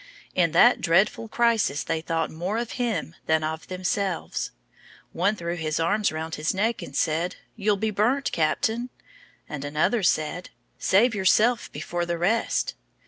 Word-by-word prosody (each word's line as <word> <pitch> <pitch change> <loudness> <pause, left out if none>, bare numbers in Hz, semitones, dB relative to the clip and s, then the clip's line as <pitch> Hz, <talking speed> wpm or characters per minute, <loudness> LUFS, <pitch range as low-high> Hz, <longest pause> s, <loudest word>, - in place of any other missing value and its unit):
In 170 -3 +2
that 240 +8 +6
dreadful 195 +6 +2
crisis 225 - +1
they 160 -1 -2
thought 165 0 -1
more 180 +7 -3
of 235 -1 -3
him 220 -9 -1
than 160 0 +2
of 160 +1 -4
themselves. 185 0 -2 0.6
One 200 +5 +1
threw 170 -3 -3
his 155 -2 -2
arms 200 +6 +1
round 160 +1 -5
his 155 +4 -1
neck 225 +4 0
and - - -8
said: 165 +2 0 0.2
"You'll 210 -2 +1
be 220 +2 -1
burnt, 245 +8 +1
Captain;" 220 +10 0 0.6
and 145 -2 -6
another 150 +11 +1
said: 180 0 0 0.3
"Save 225 +5 +4
yourself 215 +4 +3
before 175 +3 -3
the 170 0 -1
rest." 205 +7 +1
180 Hz, 150 wpm, -25 LUFS, 160-220 Hz, 0.6 s, that